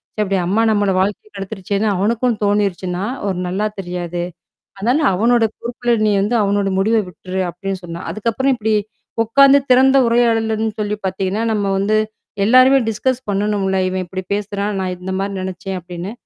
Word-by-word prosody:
ச்ச -, -, -8 dB
அப்படி 195 Hz, -1 st, 0 dB
அம்மா 205 Hz, +5 st, +2 dB
நம்மள 205 Hz, -2 st, +2 dB
வாழ்க்கைய 205 Hz, +2 st, -1 dB
கெடுத்துருச்சேன்னு! 195 Hz, +1 st, -3 dB
அவனுக்கும் 225 Hz, +4 st, +1 dB
தோணிருச்சுன்னா, 195 Hz, -3 st, 0 dB, 0.2 s
ஒரு 190 Hz, -, -1 dB
நல்லா 190 Hz, +4 st, -1 dB
தெரியாது. 175 Hz, -1 st, -4 dB, 0.6 s
அதனால 245 Hz, +9 st, +1 dB
அவனோட 235 Hz, +4 st, +3 dB, 0.2 s
பொறுப்புல 240 Hz, 0 st, -2 dB, 0.2 s
நீ -, -, +3 dB
வந்து 220 Hz, +4 st, 0 dB
அவனோட 200 Hz, 0 st, +1 dB
முடிவ 220 Hz, +4 st, +2 dB
விட்டுரு" 185 Hz, +1 st, -5 dB
அப்ப்டின்னு 190 Hz, +2 st, -5 dB
சொன்னான். 170 Hz, +1 st, -7 dB
அதுக்கப்புறம் 235 Hz, +5 st, 0 dB
இப்டி 220 Hz, -1 st, -1 dB, 0.5 s
உக்காந்து 275 Hz, +5 st, +6 dB
திறந்த 265 Hz, +2 st, +6 dB
உரையாடல்லன்னு 225 Hz, -2 st, +1 dB
சொல்லி 210 Hz, 0 st, -2 dB
பாத்தீங்கன்னா, 190 Hz, +3 st, -2 dB
நம்ம 205 Hz, -1 st, 0 dB
வந்து 210 Hz, +2 st, +2 dB, 0.5 s
எல்லாருமே 255 Hz, +4 st, +6 dB
டிஸ்கஸ் 255 Hz, +3 st, -1 dB
பண்ணணும்ல! 195 Hz, -1 st, 0 dB
"இவன் 185 Hz, 0 st, -2 dB
இப்படி 185 Hz, +2 st, -5 dB
பேசுறான் 205 Hz, 0 st, -3 dB
நான் 185 Hz, -1 st, -2 dB
இந்த 190 Hz, +1 st, -5 dB
மாரி 200 Hz, 0 st, -2 dB
நெனச்சேன்" 190 Hz, 0 st, -5 dB
அப்படின்னு. 175 Hz, +3 st, -7 dB
205 Hz, 150 wpm, -18 LUFS, 190-225 Hz, 0.6 s, உக்காந்து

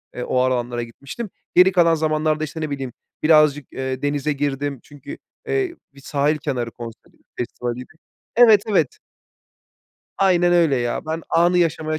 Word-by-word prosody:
eee, 125 Hz, -, -4 dB
o 130 Hz, -, -1 dB
alanlara 120 Hz, -2 st, 0 dB
gitmiştim. 140 Hz, -, -8 dB, 0.3 s
Geri 180 Hz, +1 st, +7 dB
kalan 170 Hz, -3 st, +4 dB
zamanlarda, 155 Hz, 0 st, 0 dB
işte, 155 Hz, +1 st, -5 dB
ne 155 Hz, -, -2 dB
bileyim, 135 Hz, -4 st, -5 dB, 0.3 s
birazcık, 150 Hz, -2 st, +4 dB
eee, 130 Hz, 0 st, -4 dB
denize 145 Hz, +1 st, 0 dB
girdim 140 Hz, -1 st, -2 dB
çünkü, 145 Hz, -3 st, -10 dB, 0.3 s
eee, 385 Hz, -4 st, -1 dB, 0.2 s
bir 140 Hz, -, -16 dB
sahil 145 Hz, +2 st, 0 dB
kenarı 130 Hz, -6 st, -3 dB
konseri 115 Hz, -1 st, -11 dB, 0.2 s
festivaliydi. 125 Hz, +2 st, -5 dB, 0.4 s
Evet, 225 Hz, -4 st, +7 dB
evet. 175 Hz, -, +1 dB, 1.2 s
Aynen 175 Hz, -2 st, +3 dB
öyle 165 Hz, -5 st, +4 dB
ya. 120 Hz, +4 st, -2 dB
Ben, 160 Hz, +1 st, -3 dB
anı 175 Hz, +2 st, +3 dB
yaşamaya 160 Hz, -2 st, 0 dB
150 Hz, 145 wpm, -21 LUFS, 130-165 Hz, 1.2 s, Geri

